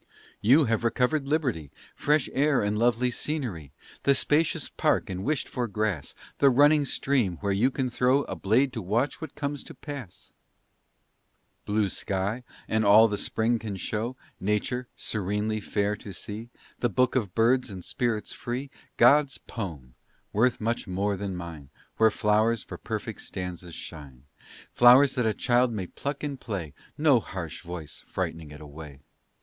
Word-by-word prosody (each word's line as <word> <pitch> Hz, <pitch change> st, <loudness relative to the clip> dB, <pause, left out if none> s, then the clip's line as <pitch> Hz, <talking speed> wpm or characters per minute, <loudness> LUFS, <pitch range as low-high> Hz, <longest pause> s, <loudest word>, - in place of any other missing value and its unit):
You 135 Hz, +8 st, +5 dB
have 115 Hz, 0 st, 0 dB
recovered 125 Hz, +5 st, +1 dB
liberty, 130 Hz, -, -1 dB, 0.2 s
Fresh 150 Hz, -1 st, +2 dB
air 140 Hz, -2 st, +3 dB
and 105 Hz, +1 st, 0 dB
lovely 120 Hz, +2 st, +2 dB
scenery, 115 Hz, -, -3 dB, 0.3 s
The 140 Hz, -, +4 dB
spacious 150 Hz, +4 st, +2 dB
park -, -, 0 dB
and 95 Hz, +1 st, -4 dB
wished 145 Hz, +1 st, 0 dB
for 125 Hz, -1 st, -2 dB
grass; 105 Hz, -7 st, -2 dB, 0.2 s
The 140 Hz, -, +6 dB
running 145 Hz, +3 st, +5 dB
stream, 125 Hz, -11 st, 0 dB
where 100 Hz, -1 st, 0 dB
you 105 Hz, +7 st, +3 dB
can 130 Hz, -1 st, -2 dB
throw 130 Hz, +4 st, +3 dB
A -, -, -5 dB
blade 125 Hz, +7 st, +2 dB
to 115 Hz, -, -3 dB
watch 115 Hz, -, -1 dB
what 160 Hz, -, -7 dB
comes 145 Hz, -1 st, -3 dB
to -, -, -11 dB
pass; 140 Hz, -, -9 dB, 1.3 s
Blue 105 Hz, 0 st, +2 dB
sky, 100 Hz, +5 st, -2 dB, 0.2 s
and 110 Hz, 0 st, +1 dB
all 105 Hz, +2 st, +7 dB
the 105 Hz, -, -2 dB
spring 115 Hz, +1 st, 0 dB
can 105 Hz, -3 st, -5 dB
show; 110 Hz, +6 st, -3 dB, 0.2 s
Nature, 105 Hz, +5 st, -1 dB
serenely 105 Hz, +1 st, -2 dB
fair 105 Hz, 0 st, -1 dB
to 100 Hz, -, -9 dB
see; 105 Hz, +5 st, -7 dB, 0.3 s
The 120 Hz, -, +1 dB
book 125 Hz, +5 st, +2 dB
of 105 Hz, -8 st, -1 dB
birds 120 Hz, +3 st, +3 dB
and 95 Hz, -3 st, -8 dB
spirits 115 Hz, -4 st, -2 dB
free, 130 Hz, +3 st, -5 dB, 0.3 s
God's 145 Hz, -1 st, +5 dB
poem, 80 Hz, -, -7 dB, 0.4 s
worth 120 Hz, +4 st, +2 dB
much 115 Hz, +1 st, -2 dB
more 100 Hz, +2 st, 0 dB
than 95 Hz, -1 st, -4 dB
mine, 80 Hz, -5 st, -8 dB, 0.3 s
Where 110 Hz, 0 st, +6 dB
flowers 110 Hz, +1 st, +2 dB
for -, -, -9 dB
perfect -, -, -5 dB
stanzas 90 Hz, -2 st, -6 dB
shine 70 Hz, -6 st, -10 dB, 0.5 s
Flowers 130 Hz, +3 st, +7 dB
that 125 Hz, -4 st, +1 dB
a 110 Hz, -, +2 dB
child 125 Hz, 0 st, +2 dB
may 100 Hz, -5 st, -3 dB
pluck 140 Hz, +11 st, -5 dB
in 145 Hz, -2 st, -3 dB
play, 95 Hz, -, -5 dB, 0.2 s
No 145 Hz, -5 st, +5 dB
harsh 85 Hz, -6 st, -6 dB
voice 85 Hz, -3 st, -7 dB
frightening 80 Hz, -2 st, -4 dB
it 75 Hz, +1 st, -11 dB
away. 75 Hz, -2 st, -10 dB
110 Hz, 160 wpm, -27 LUFS, 95-130 Hz, 1.3 s, all